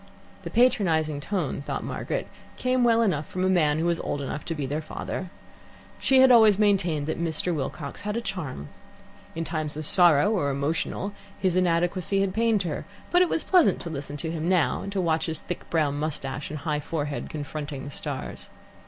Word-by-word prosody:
The - - -6
patronizing 165 - +2
tone 160 -3 -2
thought - - -4
Margaret, - - -3 0.3
came 255 0 +1
well 230 -1 +4
enough 155 -9 0
from 185 0 -2
a - - +3
man 155 -5 +3
who 160 - 0
was 170 -1 +1
old 145 - -3
enough 140 +2 -4
to 165 - -3
be 145 -3 -3
their 145 +4 -2
father. 175 +3 -5 0.7
She 265 -1 +5
had 260 -1 +7
always 220 -4 +7
maintained 185 -8 +2
that 160 +2 -3
Mr. 170 +1 0
Wilcox 140 -1 -4
had 210 +3 -2
a - - +1
charm. 155 - -5 0.7
In 165 - -2
times 155 -2 -3
of 155 - -4
sorrow 170 +1 +5
or 180 -10 +1
emotion 150 +8 -2 0.3
his 185 -2 +1
inadequacy 180 +2 +1
had 195 -1 0
pained 225 -2 +2
her, 160 -4 -3 0.3
but 355 - +5
it 360 - +4
was - - 0
pleasant 360 -3 +4
to 170 - -4
listen 145 -1 -5
to 160 +2 -3
him 165 +1 -2
now, 180 -4 +2
and 200 - -5
to 200 - -1
watch 165 -2 +1
his 160 -1 -2
thick 180 - -7
brown 145 -3 +1
moustache 140 -2 -3
and 155 - -5
high 150 -2 -1
forehead 145 -1 -3
confronting 145 -2 -5
the 145 - -7
stars. - - -5
165 Hz, 195 wpm, -26 LUFS, 150-195 Hz, 0.7 s, had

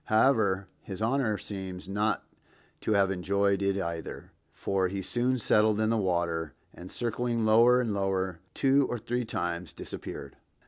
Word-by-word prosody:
However, 110 -5 +3
his 95 -2 -7
Honor 115 -1 +1
seems 95 -3 -7
not 105 +2 0 0.6
to 110 - 0
have 100 -1 +3
enjoyed 100 +1 +1
it 100 0 +1
either, 85 -3 -5 0.2
for 95 -1 0
he 95 +1 -4
soon 125 +6 +1
settled 110 -2 +3
in 110 0 +2
the - - +2
water, 85 -6 0 0.2
and 90 +1 -10
circling 120 -1 -1
lower 115 +3 +6
and 115 -4 0
lower 95 -3 -1 0.2
two 135 0 +4
or 120 - -1
three 120 +2 -2
times, 85 -4 -3
disappeared. - - -7
100 Hz, 150 wpm, -29 LUFS, 95-115 Hz, 0.6 s, lower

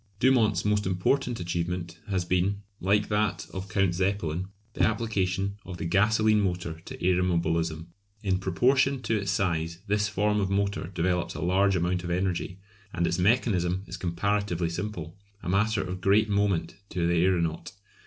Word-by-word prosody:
Dumont's 110 -7 +3
most 105 -1 +1
important 120 +7 0
achievement 85 0 -3
has 95 -3 0
been, 95 +3 0 0.2
like 100 +2 +2
that 105 -1 0
of 95 +1 -5
Count 95 -3 +2
Zeppelin, 95 -2 -1 0.3
the - - -3
application 100 -3 0
of 90 -1 -7
the 85 - -4
gasolene 110 +4 +3
motor 90 -4 -2
to - - -8
aeromobilism. 85 -3 +1 0.4
In 95 -2 +1
proportion 130 +8 +2
to 115 0 0
its 100 -2 -3
size 85 -3 0
this 105 +1 +1
form 105 +1 +1
of 95 - 0
motor 100 -3 0
develops 90 0 -1
a - - -5
large 95 +2 +3
amount 90 +1 0
of 90 - -4
energy, 90 +1 -1 0.3
and 85 -3 0
its 85 - 0
mechanism 95 -3 +2
is 90 - -7
comparatively 90 -1 -1
simple 90 -1 -5 0.2
a - - -4
matter 105 +2 +2
of 90 0 -5
great 105 +3 +4
moment 100 -5 0
to 85 -2 -1
the 85 0 +3
aeronaut. 85 -2 0
95 Hz, 160 wpm, -27 LUFS, 85-105 Hz, 0.4 s, great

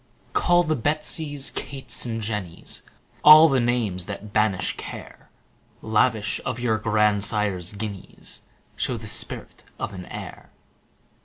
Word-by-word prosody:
Call 175 0 +4
the 155 -2 0
Betsies, 145 +1 -1
Kates, 130 -3 -1
and 115 -1 -3
Jennies, 105 -6 -3 0.4
All 155 +2 +10
the 135 -4 +2
names 115 -7 0
that 105 +1 -7
banish 105 -4 +1
care; - - -10 0.5
10 110 - -7
Lavish 110 -1 +1
of 125 -1 -3
your 115 -3 0
grandsire's 105 -3 +1
guineas, 100 -2 -7 0.3
Show - - -2
the - - -9
spirit - - 0 0.2
of - - -4
an 90 -1 -8
heir. - - -9
110 Hz, 130 wpm, -24 LUFS, 105-130 Hz, 0.5 s, All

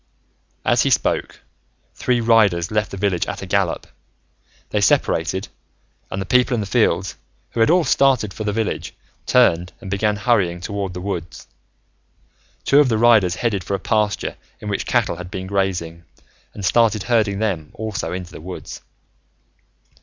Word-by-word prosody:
As - - +3
he - - +2
spoke, - - 0 0.5
three 125 -2 0
riders 105 -7 +3
left 105 -2 0
the 100 - -7
village 95 -2 0
at - - -5
a - - -5
gallop. 95 -3 0 0.9
They - - +1
separated, - - +1 0.6
and 95 - -4
the 95 - -3
people 125 +4 +3
in - - -1
the 105 - -2
fields, 95 - +1 0.3
who - - -5
had 115 - +4
all 175 +1 +4
started 130 -10 +2
for 110 - -5
the 105 - -1
village, 110 +1 -3 0.3
turned 90 -9 +3
and 95 -5 -8
began 105 +1 +1
hurrying 100 -5 +1
toward 100 0 -4
the 90 - -5
woods. 90 -4 -5 1.2
Two 140 - +5
of 145 -3 +4
the 110 - +1
riders 110 -6 +4
headed 105 -5 -1
for 100 - -2
a - - -4
pasture 105 +1 -1 0.2
in 105 - -6
which 100 - -2
cattle - - +1
had 90 0 -8
been 95 0 -5
grazing 95 -4 -2 0.5
and 100 - -5
started 110 +1 +3
herding 110 -5 +1
them 95 -8 -2
also 110 -2 -4
into 90 -1 -6
the - - -10
woods. 90 +2 -8
100 Hz, 165 wpm, -21 LUFS, 90-115 Hz, 1.2 s, Two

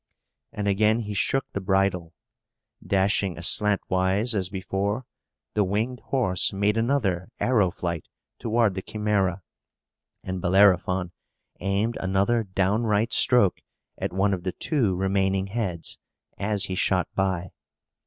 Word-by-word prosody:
And 105 -1 -3
again 105 +3 +2
he 105 -2 -5
shook 135 +6 0
the 100 - -4
bridle. 95 -3 0 0.7
Dashing 100 -1 +1
aslantwise, 95 +3 +2
as 95 -4 +1
before, 100 +4 -2 0.5
the 105 - +2
winged 110 +6 -2
horse 115 -9 +1
made 100 +2 +1
another 115 -7 0
arrow 110 -7 +2
flight 85 -3 -4 0.3
toward 115 -2 +1
the 95 - -4
Chimæra, 100 -3 -1 0.8
and 95 -1 -4
Bellerophon 95 -1 +3 0.5
aimed 100 +5 -1
another 100 +5 +1
downright 105 +3 0
stroke 120 -7 +4 0.4
at - - -3
one 95 +2 +1
of 90 - -3
the 90 0 -3
two 120 - 0
remaining 95 0 0
heads, 95 -5 -3 0.4
as 105 0 0
he 95 - -2
shot 90 -1 +1
by. 95 -2 -1
100 Hz, 125 wpm, -25 LUFS, 95-105 Hz, 0.8 s, stroke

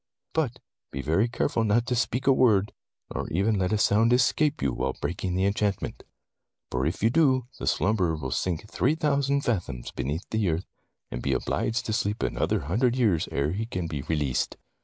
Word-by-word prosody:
"But 135 -7 0 0.3
be 70 - -5
very 85 +10 +2
careful 115 -1 0
not 110 +2 +2
to 125 - 0
speak 120 +2 0
a 135 - +6
word, 110 -6 +3 0.4
nor - - -3
even 100 +5 +1
let 95 +1 0
a 110 - +2
sound 110 +2 +3
escape 140 +5 +3
you 65 - 0
while 65 +2 -2
breaking 90 +1 -2
the 95 +1 +2
enchantment! 100 0 -1 0.7
For 65 +3 0
if 85 +5 -3
you 115 - +4
do, 130 -4 +3
the - - -4
slumberer 95 -5 +2
will 65 -4 -5
sink 90 +8 -2
three 135 +7 +1
thou 150 -3 +1
sand 140 +1 0
fathoms 85 - -2
beneath 75 +8 -3
the 110 -4 +1
earth, 80 +3 -1 0.5
and - - -4
be 70 - 0
obliged 115 - -1
to 110 - -2
sleep 105 0 -1
another - - 0
hundred 120 - +1
years 105 -11 +2
ere 70 +2 0
he 110 +5 -3
can 90 -7 -3
be 75 -3 -3
released.' 75 -3 -1
105 Hz, 195 wpm, -27 LUFS, 80-120 Hz, 0.7 s, a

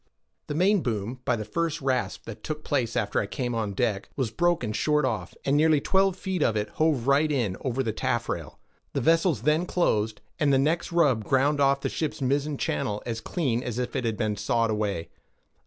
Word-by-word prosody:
The 145 - -3
mainboom, 130 - +1
by 125 - +2
the 110 -2 -5
first 165 +5 -1
rasp 130 -2 -1
that 110 -1 -9
took 155 0 -4
place 125 -6 -1
after 105 -3 0
I 100 - -1
came 125 +1 -3
on 110 -3 -2
deck, 105 -3 -1
was 130 -6 -1
broken 170 -8 +1
short 150 +4 +2
off, 105 -8 -3
and 140 - +2
nearly 155 0 +4
twelve 190 +4 +2
feet 190 -2 -3
of 115 - +2
it 105 0 -1
hove 155 -7 +1
right 145 +3 +3
in 115 -10 0
over 135 0 -1
the 110 -3 -2
taffrail; - - -2 0.4
the - - 0
vessels 165 - +3
then 155 +5 +2
closed, 110 -13 +1 0.2
and 150 -3 +3
the 135 - +5
next 155 +7 +1
rub 145 -10 +3
ground 140 +5 +2
off 140 0 +3
the - - -1
ship's 155 -2 -3
mizzen 140 +2 0
channel 105 - -2
as 115 -1 -3
clean 130 -9 -1
as 120 -2 -4
if 125 -1 -3
it - - 0
had 115 -2 -1
been 105 -2 -1
sawed 115 +1 +1
away. 100 -6 -2
130 Hz, 205 wpm, -26 LUFS, 110-155 Hz, 0.4 s, the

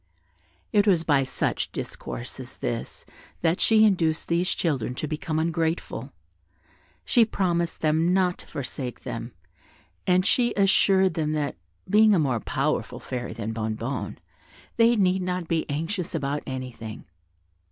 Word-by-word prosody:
It 205 0 +4
was 175 -5 +4
by 145 -4 +3
such 130 - -1
discourse - - -6
as - - -9
this - - -4 0.4
that 170 +1 +1
she 220 -1 +6
induced 165 -6 +1
these 175 +2 +1
children 130 -7 -1
to 155 - -3
become 155 +1 -3
ungrateful: 165 0 -1 0.9
she 240 - +5
promised 175 -6 0
them 160 +2 +2
not 185 -1 +2
to - - -11
forsake 130 -2 -5
them, 115 +1 -5 0.8
and 185 +1 +4 0.3
assured 190 -2 +4
them 155 -2 -1
that, 150 -2 -1 0.3
being 215 +1 +6
a - - +3
more 135 -7 +1
powerful - - -1
fairy 125 -1 -5
than 110 -1 -4
Bonnebonne, 110 +3 -3 0.6
they 230 +1 +5
need 190 -3 +2
not 180 -1 -2
be 165 -1 -1
anxious 165 +5 -2
about 140 +1 -1
anything. 125 -4 -6
165 Hz, 135 wpm, -26 LUFS, 135-185 Hz, 0.9 s, she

